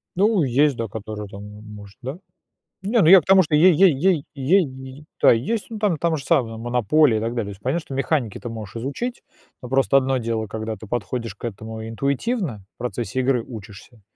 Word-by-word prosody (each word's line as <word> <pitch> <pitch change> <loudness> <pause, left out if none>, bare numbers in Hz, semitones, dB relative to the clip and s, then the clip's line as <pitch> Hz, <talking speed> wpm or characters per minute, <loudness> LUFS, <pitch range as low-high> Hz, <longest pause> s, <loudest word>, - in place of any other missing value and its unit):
Ну, 200 -1 +3
есть, 140 +2 +2
да, 115 -1 -3
которая 105 0 -7
там 100 0 -10 0.2
может, 105 -2 -12
да. 130 +6 -5 0.6
Не, 215 +5 +1
ну 160 - +4
я 185 +1 +9
к - - -24
тому, 190 0 +6
что 155 -2 0
ей 180 +5 +7
ей 180 +1 +5
ей 160 0 +1
ей, 135 -2 -1 0.2
да, - - +7
есть. 170 - 0
Ну, 225 - -6
там 205 -6 +1
там 165 0 0
же 140 - -8
самая 120 -9 +1
"Монополия", 120 +2 +2
и - - -1
так 115 - -1
далее. 120 -3 -2
То 100 - -7
есть 100 0 -10
понятно, 135 +9 0
что - - -8
механики 135 -5 -1
ты 120 - -6
можешь 110 -3 -8
изучить, 140 - -4 0.4
но 125 - -8
просто 135 +1 +2
одно 135 -1 +1
дело, 115 -2 -2
когда 110 +1 -4
ты 110 - -11
подходишь 115 -1 -4
к - - -9
этому 110 0 -6
интуитивно, 140 - -2
в - - -66
процессе 120 0 -3
игры 125 -1 +1
учишься, 110 +1 -11
130 Hz, 210 wpm, -22 LUFS, 110-155 Hz, 0.6 s, я